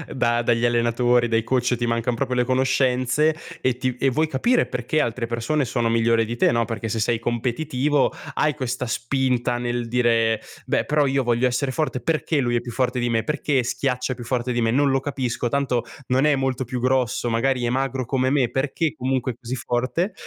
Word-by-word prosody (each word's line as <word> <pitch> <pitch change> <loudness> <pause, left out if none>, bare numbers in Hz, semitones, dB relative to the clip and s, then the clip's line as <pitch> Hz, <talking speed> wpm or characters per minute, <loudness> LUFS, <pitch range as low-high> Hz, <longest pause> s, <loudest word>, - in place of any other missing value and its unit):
da 120 -1 +1
dagli 120 0 +1
allenatori, 120 +1 +2
dai 115 -1 +1
coach, 125 0 0
e - - +2
ti 120 - -1
mancan 115 +1 0
proprio 130 +1 -2
le 125 0 +1
conoscenze 130 +3 +2 0.3
e 130 -2 +1
ti 130 -1 -2
e 135 - +2
vuoi 155 +5 +1
capire 235 - +2
perché 125 +5 -1
altre 115 -2 -2
persone 125 +6 -1
sono 115 -1 0
migliori 115 0 +3
di 120 +2 -5
te, - - +3
no, 115 0 +2
perché 115 +1 -4
se 110 +1 -2
sei 115 +1 +1
competitivo 130 +4 0 0.2
hai 150 -1 +2
questa 130 -2 -3
spinta 125 0 0
nel 120 -1 -2
dire: 115 -2 +2 0.3
"Beh, - - 0
però 150 -1 +2
io 135 0 +1
voglio 120 +1 +2
essere 130 +2 -1
forte. 130 -3 -1
Perché 160 0 0
lui 120 -3 +1
è 120 - +1
più 120 0 -7
forte 125 +1 0
di 120 - 0
me? 115 -1 +1
Perché 145 0 0
schiaccia 125 +1 -1
più 120 - -9
forte 125 +1 -1
di 120 - 0
me? 115 -1 +2
Non 140 +3 +3
lo 135 0 +1
capisco, 130 -4 -2
tanto 135 -4 0 0.2
non 130 +2 +2
è 150 -1 +4
molto 130 -1 -1
più 125 +1 -4
grosso" 125 -1 0
magari 125 +2 +1
è - - 0
magro 135 0 -1
come 130 +1 0
me 135 -3 +2
"perché 140 +5 -1
comunque 130 0 -1
è - - -20
così 125 0 -5
forte?" 130 - -1
125 Hz, 210 wpm, -23 LUFS, 120-135 Hz, 0.3 s, è